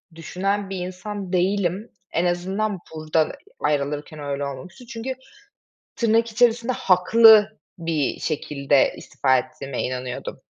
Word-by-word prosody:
düşünen 195 +4 -2
bir 195 - -4
insan 185 +2 -6
değilim. 190 +3 0 0.2
En 170 - +1
azından 190 +3 -1 0.2
buradan 155 0 0 0.3
ayrılırken 150 +1 -2
öyle 140 -1 -3
olmamıştı. 140 - -8
Çünkü 240 +2 -5 0.8
tırnak 230 0 +2
içerisinde 235 +2 +2
haklı 215 +3 +6 0.2
bir 165 -5 -1
şekilde 140 -3 +1
istifa 130 -1 +1
ettiğime 140 -1 -4
inanıyordum. 125 0 -5
180 Hz, 110 wpm, -23 LUFS, 150-210 Hz, 0.8 s, haklı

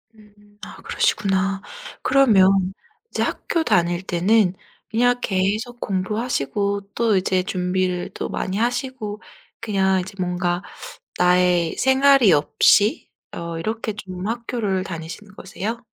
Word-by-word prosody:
음 205 -1 -22
아 - - -10
그러시구나. 195 0 0 0.4
그러면 195 -8 +4 0.4
이제 - - -1
학교 330 - -1
다닐 175 - +1
때는 185 +2 +2 0.4
그냥 245 +2 +2
계속 210 +5 -1
공부하시고 200 - -2
또 230 -3 +2
이제 185 0 +1
준비를 180 -1 -1
또 - - -4
많이 190 +1 -3
하시고 240 -2 -2 0.4
그냥 190 -4 +1
이제 190 +3 -8
뭔가 180 -1 -1 0.6
나의 180 -2 +3
생활이 265 -4 +5
없이 180 +8 +3 0.2
어 170 -1 -6
이렇게 220 +2 -3
좀 185 -2 -7
학교를 225 -5 -2
다니시는 175 +4 -8
거세요? 215 +5 -5
195 Hz, 250 characters per minute, -22 LUFS, 180-225 Hz, 0.6 s, 생활이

